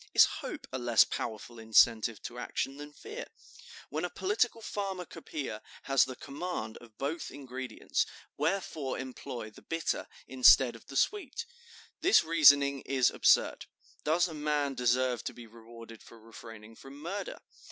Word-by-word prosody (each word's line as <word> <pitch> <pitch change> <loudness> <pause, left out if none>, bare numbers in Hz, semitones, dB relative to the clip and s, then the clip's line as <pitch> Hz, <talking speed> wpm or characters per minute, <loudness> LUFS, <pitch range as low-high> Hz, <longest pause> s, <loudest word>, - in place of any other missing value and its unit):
Is - - +9 0.2
hope - - -6
a 130 - -3
less 120 -2 +5
powerful 115 +1 -5
incentive 110 0 +3
to 120 0 -7
action 135 +2 -3
than 145 0 -9
fear? - - -8 0.6
When 155 +3 -3
a 180 - -1
political 210 +6 0
pharmacopoeia 180 - -5 0.2
has 135 -1 +4
the 130 0 -7
command 140 -6 -5
of 115 -3 -16
both 150 +5 -3
ingredients, 130 -2 -3 0.3
wherefore 155 -4 -2
employ 125 -3 -7
the - - -16
bitter 165 0 -2 0.2
instead 130 -1 +6
of 115 - -15
the 135 - -5
sweet?' 415 - 0 0.6
This 375 - +5
reasoning 145 -4 +5
is 130 -2 +2
absurd. - - +3 0.4
Does 170 +4 +2
a 165 - -8
man 150 -2 0
deserve 125 -1 +1
to - - -3
be 120 - -10
rewarded 115 0 -13
for 115 - -15
refraining 115 0 -12
from 135 +1 -12
murder? 185 +7 -5
135 Hz, 145 wpm, -31 LUFS, 120-160 Hz, 0.6 s, Is